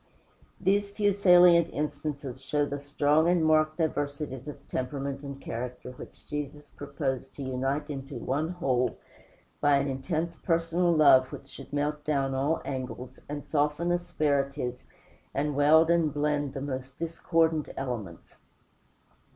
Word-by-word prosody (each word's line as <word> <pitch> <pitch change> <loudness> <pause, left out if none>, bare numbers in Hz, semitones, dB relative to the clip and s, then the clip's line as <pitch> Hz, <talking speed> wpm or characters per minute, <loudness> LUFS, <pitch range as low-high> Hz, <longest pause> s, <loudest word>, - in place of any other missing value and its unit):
These 200 +2 +2
few 205 0 +1
salient 180 -3 +6
instances 145 -3 -4
show 145 +2 +1
the 145 0 -4
strong 145 +3 +2
and 175 -2 +3
marked 155 0 +3
diversities 145 -4 -2
of 150 - -9
temperament 135 +1 -3
and 140 -1 -7
character 125 0 -6
which - - -12
Jesus 150 0 -5
proposed 140 -2 -4
to 140 - -6
unite 135 +3 -1
into 140 -1 -6
one 140 +7 -1
whole, 135 -8 0 0.6
by 145 -1 +5
an 140 +1 0
intense 155 +5 -2
personal 170 +1 +1
love 140 -5 +6
which - - -9
should - - -11
melt 150 +1 -1
down 140 -3 0
all 140 +5 0
angles, 130 -1 -5
and 145 0 -5
soften 150 +3 +1
asperities, 140 -7 -1 0.5
and 145 +1 0
weld 160 +3 +5
and 165 -3 +3
blend 145 -1 0
the 135 - -3
most 135 -1 -5
discordant 165 -1 +1
elements. 115 -10 -6
145 Hz, 135 wpm, -28 LUFS, 135-160 Hz, 0.6 s, salient